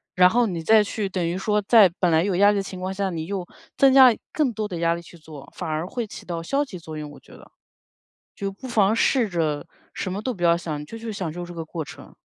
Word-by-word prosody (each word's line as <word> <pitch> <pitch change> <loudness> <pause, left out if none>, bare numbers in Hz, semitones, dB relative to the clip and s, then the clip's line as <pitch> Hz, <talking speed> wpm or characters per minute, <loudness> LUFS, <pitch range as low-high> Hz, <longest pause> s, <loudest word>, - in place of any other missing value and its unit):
然 180 0 +6
后 240 +4 +2
你 175 -5 -3
再 215 +6 +5
去 205 0 -3
等 185 -2 -2
于 170 +2 -2
说 210 +2 0
在 205 -1 +6
本 180 -2 +2
来 160 +1 +4
有 195 -1 0
压 200 +3 +5
力 205 - 0
的 200 - -1
情 190 -1 -8
况 185 +1 -3
下， 195 0 -1
你 165 -3 -4
又 185 -1 -4 0.3
增 270 -1 +5
加 260 -3 +8 0.2
更 285 -6 0
多 215 0 -3
的 180 -4 -5
压 170 0 +2
力 170 - -5
去 170 0 -15
做， 155 -3 -12
反 - - -5
而 155 +2 -2
会 235 +4 -4
起 210 - -11
到 170 -2 -4
消 275 +11 0
极 200 -9 -9
作 160 -2 -8
用， 150 -1 -6
我 - - -13
觉 - - -21
得 - - -15 0.9
就 200 -1 -4
不 200 +7 -11
妨 215 -3 +3
试 245 -1 +2
着 160 -5 -2 0.3
什 185 - -3
么 200 +3 -4
都 255 - -2
不 180 - -10
要 170 -1 +5
想， 155 -3 -5
就 225 - -9
去 225 -1 -6
享 185 -6 -4
受 175 +2 -6
这 175 - -9
个 165 -1 -5
过 160 0 -5
程。 - - -13
185 Hz, 295 characters per minute, -23 LUFS, 170-210 Hz, 0.9 s, 加